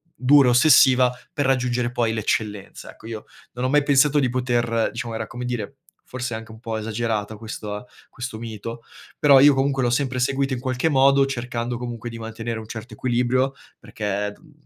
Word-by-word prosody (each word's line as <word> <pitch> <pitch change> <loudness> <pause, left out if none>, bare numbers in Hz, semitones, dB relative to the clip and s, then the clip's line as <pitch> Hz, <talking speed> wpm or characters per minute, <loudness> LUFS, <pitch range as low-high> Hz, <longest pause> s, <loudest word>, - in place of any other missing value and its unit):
dura, 135 0 +5
ossessiva, 125 -1 +6 0.2
per 145 - -1
raggiungere 125 -2 0
poi 120 -2 0
l'eccellenza. 105 -2 -3
Ecco, 110 - -14
io 110 -2 -7 0.3
non 125 +1 -3
ho - - +1
mai 145 0 +3
pensato 145 +1 +4
di 130 -3 +1
poter 120 -2 0
diciamo, 115 0 -5
era 110 -1 -4
come 125 +1 -7
dire, 120 +1 -4 0.3
forse 125 -2 -5
anche 110 0 -7
un 110 - -12
po' 115 -2 -4
esagerata 110 -1 -2
questa 110 0 -7 0.2
questo 120 -3 -7
mito, 115 +1 -7 0.4
però 140 -2 +7
io 145 +1 +7
comunque 135 0 0
l'ho 120 - +2
sempre 130 0 0
seguito 135 +1 0
in 125 - -3
qualche 130 +4 -1
modo, 135 0 +4
cercando 120 -2 -3
comunque 120 -1 -6
di 115 - -8
mantenere 115 +1 -5
un 110 - -10
certo 110 0 -8
equilibrio, 130 +2 0 0.3
perché, 105 -1 -3
uhm, 155 -2 -21
120 Hz, 180 wpm, -23 LUFS, 115-130 Hz, 0.4 s, però